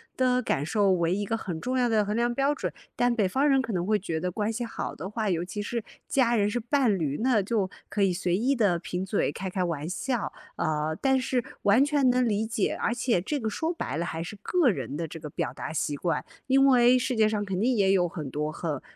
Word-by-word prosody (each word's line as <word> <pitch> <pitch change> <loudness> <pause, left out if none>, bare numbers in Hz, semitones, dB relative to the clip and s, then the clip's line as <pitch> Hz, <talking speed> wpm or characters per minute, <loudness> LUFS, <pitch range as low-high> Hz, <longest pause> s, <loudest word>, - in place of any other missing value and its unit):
的 255 -1 +2
感 145 - -1
受 200 +1 +2
为 170 -1 +1
一 205 +2 -1
个 225 - -1
很 180 -7 -4
重 255 +6 -2
要 245 -1 +2
的 215 -2 +2
衡 210 +2 -2
量 240 +1 +1
标 275 +3 +1
准， - - -3 0.2
但 245 0 +2
北 215 -5 +2
方 270 +10 +1
人 270 -2 +4
可 230 -4 -4
能 175 -1 -1
会 210 +1 +2
觉 170 -4 -3
得 180 +3 -2
关 210 +4 -1
系 235 +2 -3
好 230 - -5
的 185 +6 -6
话， 215 -1 -2
尤 170 -2 0
其 185 +3 -5
是 230 +2 -3 0.2
家 240 -3 +2
人、 205 0 +2
是 225 - -2
伴 240 -3 +2
侣， 150 -4 -1
那 245 -4 +3
就 205 -2 0 0.2
可 205 - -2
以 195 -2 +3
随 180 -1 -1
意 260 +6 +1
地 200 -8 +2
贫 180 +1 -4
嘴、 195 +2 0
开 190 -1 -4
开 185 - -2
玩 165 -4 -2
笑。 240 +4 -2 0.2
呃， 155 -1 -1
但 265 -1 +3
是 255 -1 0 0.2
完 205 +6 +5
全 285 -3 +3
能 250 0 +3
理 215 -1 +1
解， 220 -3 -1
而 235 - +1
且 245 -5 +1
这 285 - -2
个 220 -3 -2
说 325 - -2
白 330 - -4
了 170 - -1
还 165 -1 -4
是 205 +4 -8
个 340 - +3
人 140 - -3
的 165 +2 -2
这 165 +1 -8
个 150 - -7
表 - - -3
达 - - -6
习 150 -2 -1
惯， 165 +3 -1 0.2
因 270 +1 +5
为 250 -1 +6
世 250 0 -1
界 215 -1 +4
上 210 -1 -1
肯 190 -2 -2
定 250 +4 +2
也 195 -3 +3
有 180 -2 +3
很 155 -5 -6
多， 150 +3 -2
很 150 -3 -4
210 Hz, 275 characters per minute, -27 LUFS, 175-245 Hz, 0.2 s, 为